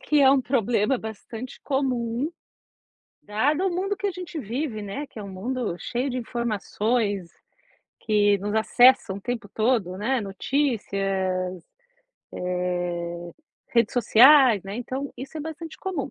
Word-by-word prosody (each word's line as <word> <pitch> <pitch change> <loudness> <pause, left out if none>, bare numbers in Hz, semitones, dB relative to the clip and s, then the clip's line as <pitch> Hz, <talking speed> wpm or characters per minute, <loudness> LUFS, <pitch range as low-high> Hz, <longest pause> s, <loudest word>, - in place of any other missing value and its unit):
que 300 -1 +2
é 270 -1 +7
um 275 0 +4
problema 245 -1 +1
bastante 220 +3 -8
comum, 260 -1 -1 0.9
dado 290 - +1
o - - +1
mundo 390 +2 -1
que 410 - -2
a 400 - +1
gente 355 -2 -7
vive, 240 -1 -3
né, 205 +9 -5
que 270 - -13
é - - -5
um 200 - -7
mundo 220 +1 -3
cheio 250 +3 -2
de 255 - -3
informações, 220 -4 -1 0.7
que 205 -2 +3
nos 205 +2 -3
acessam 230 -2 +5
o - - -8
tempo 235 -1 -4
todo, 215 -5 +1
né, 250 +5 0
notícias, 195 - -1 0.7
eh, 175 -1 -3 0.4
redes 235 -2 +3
sociais, 245 -1 +7
né, 195 +1 -6
então 260 +3 -4
isso 270 +4 -8
é - - -4
bastante 320 +1 -7
comum. 360 -8 -3
235 Hz, 140 wpm, -25 LUFS, 200-270 Hz, 0.9 s, é